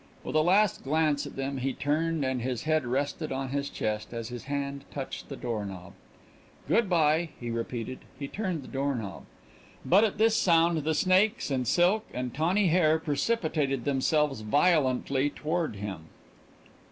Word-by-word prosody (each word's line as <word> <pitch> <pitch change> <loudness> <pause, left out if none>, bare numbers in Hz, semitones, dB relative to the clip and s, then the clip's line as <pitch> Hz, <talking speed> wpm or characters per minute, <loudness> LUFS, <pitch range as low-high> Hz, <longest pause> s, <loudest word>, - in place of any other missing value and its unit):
With - - -5
a 155 - +5
last 195 +4 +3
glance 150 0 +1
at - - -10
them 135 0 -3
he 135 +1 -1
turned 155 +1 0
and 130 -1 -1
his 125 -2 -3
head 155 -4 +1
rested 140 +5 -2
on 135 0 -3
his 140 +1 -2
chest 110 +2 -3
as 115 0 -4
his 120 0 -7
hand 140 0 -3
touched 135 -2 -6
the 140 - -5
door 115 -5 -3
knob. 95 -1 -8 0.7
"Good 225 -3 +2
by," 160 -1 +3
he 120 -1 -4
repeated. 115 +1 -4 0.2
He 140 0 -5
turned 185 -4 -3
the - - -11
door 140 0 -1
knob. 105 -5 -6 0.6
But 195 +5 +5
at 220 - 0
this 220 +1 +4
sound 170 -3 +3
the 155 +1 0
snakes 190 +3 +2
and 130 -2 0
silk 190 +6 +3
and 125 -1 -3
tawny 175 +6 +2
hair 160 -2 +4
precipitated 150 - -1
themselves 140 -1 +1
violently 135 +1 +2
toward 155 -2 -2
him. 95 -5 -6
145 Hz, 165 wpm, -28 LUFS, 130-165 Hz, 0.7 s, a